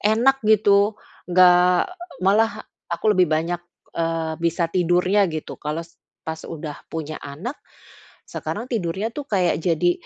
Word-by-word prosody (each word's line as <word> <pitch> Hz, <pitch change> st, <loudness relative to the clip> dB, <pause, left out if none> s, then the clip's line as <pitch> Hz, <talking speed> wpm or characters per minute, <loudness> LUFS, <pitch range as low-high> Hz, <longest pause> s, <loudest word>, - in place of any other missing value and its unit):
enak 235 Hz, +6 st, +3 dB
gitu, 205 Hz, 0 st, +4 dB, 0.3 s
enggak 180 Hz, 0 st, +5 dB
e 355 Hz, -1 st, -12 dB
malah 215 Hz, +2 st, +2 dB, 0.2 s
aku 210 Hz, +5 st, +1 dB
lebih 180 Hz, -4 st, +3 dB
banyak, 165 Hz, +2 st, 0 dB, 0.3 s
eee, 165 Hz, -1 st, -1 dB
bisa 170 Hz, 0 st, +1 dB
tidurnya 180 Hz, +2 st, +3 dB
gitu. 155 Hz, -1 st, -6 dB
Kalau 155 Hz, +3 st, -3 dB
se 170 Hz, -, -25 dB, 0.2 s
pas 160 Hz, 0 st, -5 dB
udah 155 Hz, -2 st, -7 dB
punya 155 Hz, -1 st, -5 dB
anak, 155 Hz, -, -6 dB, 0.8 s
sekarang 240 Hz, -, -5 dB
tidurnya 195 Hz, -2 st, -2 dB
itu 295 Hz, -, -4 dB
kayak 190 Hz, -9 st, +1 dB
jadi, 175 Hz, 0 st, +2 dB
180 Hz, 135 wpm, -22 LUFS, 165-210 Hz, 0.8 s, enggak